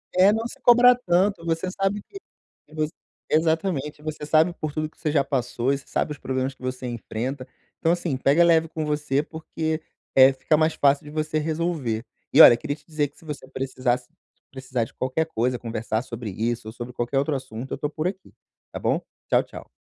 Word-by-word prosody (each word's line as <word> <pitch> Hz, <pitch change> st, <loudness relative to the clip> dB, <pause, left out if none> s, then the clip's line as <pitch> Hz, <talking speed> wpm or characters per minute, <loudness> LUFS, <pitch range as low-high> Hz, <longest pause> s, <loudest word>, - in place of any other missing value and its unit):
É, 185 Hz, +2 st, +6 dB
não 225 Hz, +2 st, -1 dB
se -, -, -13 dB
cobra 245 Hz, +1 st, +7 dB
tanto, 185 Hz, -5 st, +1 dB
você 165 Hz, +2 st, -1 dB
sabe 195 Hz, +1 st, -1 dB
que 395 Hz, -, -11 dB, 0.5 s
vo 155 Hz, -1 st, 0 dB, 0.4 s
exatamente. 160 Hz, -2 st, 0 dB
Você 155 Hz, -1 st, -5 dB
sabe 160 Hz, +3 st, +3 dB
por 155 Hz, -, -2 dB
tudo 155 Hz, 0 st, -2 dB
que -, -, -33 dB
você 150 Hz, -, -1 dB
já 145 Hz, -2 st, +3 dB
passou 135 Hz, -1 st, -1 dB
e -, -, 0 dB
você 140 Hz, -, -15 dB
sabe -, -, -1 dB
os 150 Hz, -, -5 dB
problemas 130 Hz, 0 st, -2 dB
que -, -, -27 dB
você 130 Hz, 0 st, -4 dB
enfrenta, 125 Hz, +3 st, -4 dB, 0.3 s
então 165 Hz, -, +2 dB
assim, 175 Hz, -4 st, -1 dB
pega 140 Hz, +6 st, +4 dB
leve 165 Hz, -1 st, +4 dB
com 160 Hz, -1 st, -3 dB
você, 150 Hz, -2 st, 0 dB
porque, 160 Hz, 0 st, -4 dB, 0.3 s
eh, 135 Hz, 0 st, +8 dB
fica 135 Hz, +4 st, +1 dB
mais 155 Hz, +1 st, +2 dB
fácil 140 Hz, 0 st, +3 dB
de 150 Hz, -, -9 dB
você 155 Hz, 0 st, -1 dB
resolver. 155 Hz, -8 st, -1 dB, 0.3 s
E -, -, +9 dB
olha, -, -, +11 dB
queria 145 Hz, +3 st, -3 dB
te -, -, -25 dB
dizer 150 Hz, -3 st, -1 dB
que 145 Hz, -, -31 dB
se -, -, -18 dB
você 145 Hz, -3 st, -7 dB
precisasse 130 Hz, -2 st, -1 dB, 0.4 s
precisar 130 Hz, -3 st, -2 dB
de -, -, -16 dB
qualquer 130 Hz, +5 st, -1 dB
coisa, 125 Hz, -4 st, -1 dB
conversar 115 Hz, -1 st, -2 dB
sobre 115 Hz, -3 st, -6 dB
isso 115 Hz, +3 st, -2 dB
ou -, -, -8 dB
sobre 120 Hz, +1 st, -8 dB
qualquer 120 Hz, +3 st, -1 dB
outro 145 Hz, +1 st, 0 dB
assunto, 125 Hz, -1 st, -6 dB
eu -, -, -3 dB
tô 145 Hz, +2 st, -2 dB
por 155 Hz, +2 st, -2 dB
aqui, 190 Hz, +1 st, -7 dB, 0.4 s
tá -, -, -6 dB
bom? -, -, +1 dB, 0.3 s
Tchau, -, -, +4 dB
tchau. -, -, -11 dB
150 Hz, 210 wpm, -24 LUFS, 130-160 Hz, 0.5 s, olha